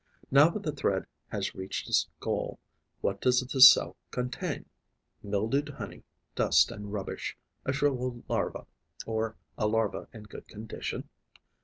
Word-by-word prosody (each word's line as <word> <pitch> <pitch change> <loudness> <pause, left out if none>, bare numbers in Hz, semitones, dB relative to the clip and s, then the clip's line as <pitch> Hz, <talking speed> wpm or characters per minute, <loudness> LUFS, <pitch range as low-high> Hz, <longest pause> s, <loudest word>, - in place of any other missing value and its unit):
Now 140 +4 +7
that 205 +4 -5
the 155 - -1
thread 100 -9 0 0.2
has - - -3
reached 95 +1 -5
its - - +2
goal, - - -2 0.4
what 100 0 -1
does 125 0 +4
the 130 +1 -2
cell 130 - +9
contain? 125 0 -3 0.6
Mildewed 110 +9 0
honey, 145 - -8 0.3
dust - - +4
and 105 0 -7
rubbish, 100 -2 -4 0.3
a - - +1
shrivelled 130 -3 0
larva, - - -1 0.4
or 110 0 -2 0.2
a 105 - +2
larva 110 -1 0
in 110 - -10
good 105 - -11
condition? 110 +1 -6
120 Hz, 140 wpm, -29 LUFS, 105-135 Hz, 0.6 s, cell